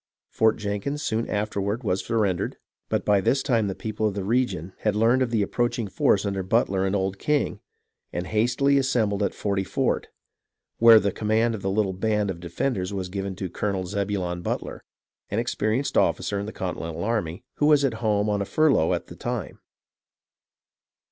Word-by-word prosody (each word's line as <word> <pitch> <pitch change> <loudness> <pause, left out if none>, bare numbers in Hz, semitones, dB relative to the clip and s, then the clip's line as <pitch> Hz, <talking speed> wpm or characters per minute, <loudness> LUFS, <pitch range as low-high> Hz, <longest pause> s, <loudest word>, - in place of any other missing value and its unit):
Fort 110 0 +3
Jenkins 105 +8 -3
soon 115 +1 -1
afterward 105 +2 -2
was 95 -3 0
sur 115 - -1
rendered; 100 -5 0 0.3
but - - -1
by 100 -2 +4
this 135 +8 +2
time 115 -5 +2
the 95 - -3
people 110 0 -2
of 100 - -3
the 100 - -2
region 105 -5 0
had 105 -1 0
learned 115 +4 +3
of 130 - +1
the 110 -3 +1
approaching 120 +1 -1
force 100 +1 +2
under 100 -1 -1
Butler 95 -1 +1
and 95 - 0
Old 95 0 -1
King, 150 -2 0 0.5
and 90 - -3
hastily 120 +7 +2
assembled 115 -7 +1
at 100 - 0
Forty 100 -2 -1
Fort, - - -1 0.7
where 115 -1 +9
the 100 -1 0
command 110 +3 +1
of 110 - -5
the 95 - -1
little 100 -1 +1
band 105 +1 0
of 85 - -8
defenders 90 +3 -2
was 95 -2 -4
given 95 0 -4
to 95 0 -4
Colonel 95 +1 -2
Zebulon 95 -2 -2
Butler, - - -4 0.5
an 105 - -2
experienced 115 +2 -1
officer 100 - +1
in 100 - -4
the - - -5
Con 95 -4 -4
tinental 85 0 -5
army, 100 -7 -2
who 145 - +3
was 150 -2 +5
at 135 - +1
home 105 -2 +1
on 105 -1 0
a - - -1
furlough 145 - +3
at - - -5
the - - -11
time. - - -4
105 Hz, 190 wpm, -25 LUFS, 95-115 Hz, 0.7 s, where